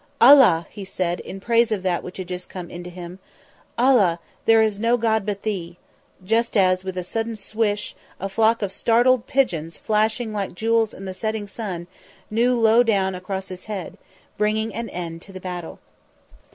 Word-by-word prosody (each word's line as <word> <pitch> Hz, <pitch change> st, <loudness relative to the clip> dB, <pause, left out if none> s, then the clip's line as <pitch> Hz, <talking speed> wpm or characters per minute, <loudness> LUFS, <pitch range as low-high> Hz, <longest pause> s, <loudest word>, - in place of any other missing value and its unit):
"Allah!" 240 Hz, -, +7 dB
he 205 Hz, -, -8 dB
said, 180 Hz, -2 st, -2 dB
in 195 Hz, -, -8 dB
praise 230 Hz, +2 st, +2 dB
of 200 Hz, -3 st, -1 dB
that 180 Hz, -2 st, 0 dB
which 180 Hz, -, -9 dB
had 185 Hz, -1 st, -6 dB, 0.2 s
come 180 Hz, -2 st, -8 dB
unto 175 Hz, +1 st, -7 dB
him, 180 Hz, +1 st, -9 dB, 0.6 s
"Allah, 235 Hz, -9 st, +4 dB, 0.3 s
there 225 Hz, 0 st, +6 dB
is 210 Hz, -2 st, -1 dB
no 230 Hz, +2 st, +2 dB
God 220 Hz, -3 st, 0 dB
but 200 Hz, -1 st, -3 dB
Thee," 180 Hz, -5 st, -4 dB, 0.5 s
just 230 Hz, +3 st, +1 dB
as, 185 Hz, -1 st, +3 dB
with 190 Hz, -1 st, -5 dB
a 180 Hz, -, -2 dB
sudden 225 Hz, +5 st, -3 dB
swish, 210 Hz, -1 st, -2 dB, 0.2 s
a 195 Hz, -, -3 dB
flock 220 Hz, +3 st, +2 dB
of 195 Hz, -, -2 dB
startled 240 Hz, +3 st, +3 dB
pigeons 170 Hz, -, 0 dB
flashing 220 Hz, +1 st, 0 dB
like 200 Hz, -4 st, -3 dB
jewels 225 Hz, +1 st, +1 dB
in 195 Hz, -, -9 dB
the 190 Hz, -, -5 dB
setting 215 Hz, +2 st, -3 dB
sun 195 Hz, -4 st, -6 dB, 0.5 s
new 240 Hz, +2 st, +2 dB
low 225 Hz, +1 st, +5 dB
down 195 Hz, -5 st, +1 dB
across 190 Hz, +1 st, -5 dB
his 185 Hz, 0 st, -9 dB
head, 200 Hz, -5 st, -6 dB, 0.4 s
bringing 215 Hz, +1 st, 0 dB
an 230 Hz, +1 st, -4 dB
end 165 Hz, -2 st, -6 dB
to 195 Hz, -, -13 dB
the 190 Hz, -, -8 dB
battle. 180 Hz, -2 st, -6 dB
205 Hz, 180 wpm, -23 LUFS, 185-225 Hz, 0.6 s, Allah